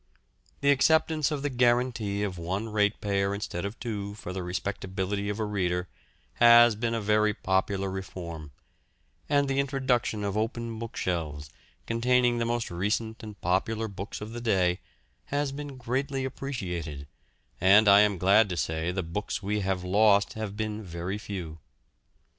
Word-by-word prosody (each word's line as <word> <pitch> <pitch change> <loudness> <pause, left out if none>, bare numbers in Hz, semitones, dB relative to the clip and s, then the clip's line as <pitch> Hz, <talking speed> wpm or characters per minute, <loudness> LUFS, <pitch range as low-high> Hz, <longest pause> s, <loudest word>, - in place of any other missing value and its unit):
The 140 0 +5
acceptance 155 +1 +3
of 150 -2 -3
the 145 - 0
guarantee 120 -4 +1
of 95 -4 -3
one 95 +6 -3
ratepayer 105 -2 +1
instead 100 -3 -4
of 100 +3 -6
two 105 -4 -4
for 90 -3 -7
the 95 - -3
respectability 95 +2 -3
of 105 +1 -3
a 110 - 0
reader 90 -4 -1 0.5
has 120 0 +8
been 115 +2 -1
a - - 0
very 105 0 +2
popular 95 +1 0
reform, 85 -5 -6 0.8
and 145 -1 +3
the 135 0 0
introduction 130 -6 0
of 100 -1 -2
open 115 +1 -2
bookshelves, 80 -10 -3 0.3
containing 120 +1 +2
the 115 - 0
most 120 -3 -2
recent 105 +5 -2
and 105 -2 -9
popular 110 +5 0
books 100 +1 -7
of 105 +1 -6
the 120 - -5
day, 95 -5 +2 0.5
has 145 -1 -1
been 140 -1 -7
greatly 130 +2 -2
appreciated, 90 - -5 0.6
and 100 +4 +6
I 100 0 +8
am 105 -2 +3
glad 100 +4 +4
to 90 - -3
say 80 +2 -1
the 95 0 -2
books 100 +5 -4
we 105 +2 0
have 95 -2 -1
lost 100 +2 +4
have 105 -2 -5
been 110 0 -3
very 90 +1 -5
few. 90 -6 -6
105 Hz, 155 wpm, -28 LUFS, 95-120 Hz, 0.8 s, has